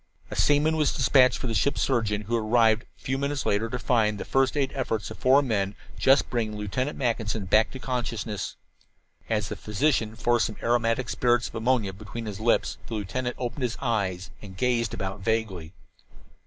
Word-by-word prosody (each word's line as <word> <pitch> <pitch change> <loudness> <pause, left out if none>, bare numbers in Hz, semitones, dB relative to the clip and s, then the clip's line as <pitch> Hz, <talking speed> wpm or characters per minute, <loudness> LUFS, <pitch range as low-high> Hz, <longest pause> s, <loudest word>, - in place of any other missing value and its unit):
A - - -4
seaman 150 +2 +3
was 150 -2 +2
dispatched 130 -1 +4
for - - -6
the 115 - -1
ship's 140 +5 +1
surgeon, 110 -5 0
who 115 +3 -1
arrived 110 0 +3
a - - -34
few 135 +1 -2
minutes 140 0 -2
later 105 +3 +1
to 125 - -2
find 110 -4 +1
the - - -6
first 135 +1 +1
aid 135 -2 +1
efforts 120 -6 -2
of - - -8
the - - -22
four 135 +3 +5
men 100 -5 -1 0.2
just 135 +1 +4
bringing 110 -3 -1
Lieutenant 115 +8 -2
Mackinson 110 -5 -1
back 105 +4 +4
to - - -8
consciousness. 120 -5 -3 0.7
As 105 -3 0
the - - -4
physician 110 0 0
forced 120 +1 +2
some 110 - -8
aromatic 120 +1 +1
spirits 120 -2 +1
of - - -18
ammonia 115 -3 0
between 110 +4 -7
his 105 -2 -6
lips 115 +2 +1
the 115 - -4
lieutenant 110 +5 -3
opened 125 +3 -4
his 120 -2 -1
eyes 100 -7 -1
and 95 -3 -11
gazed 120 0 0
about 95 +1 -4
vaguely. 100 -6 -2
115 Hz, 190 wpm, -26 LUFS, 105-130 Hz, 0.7 s, four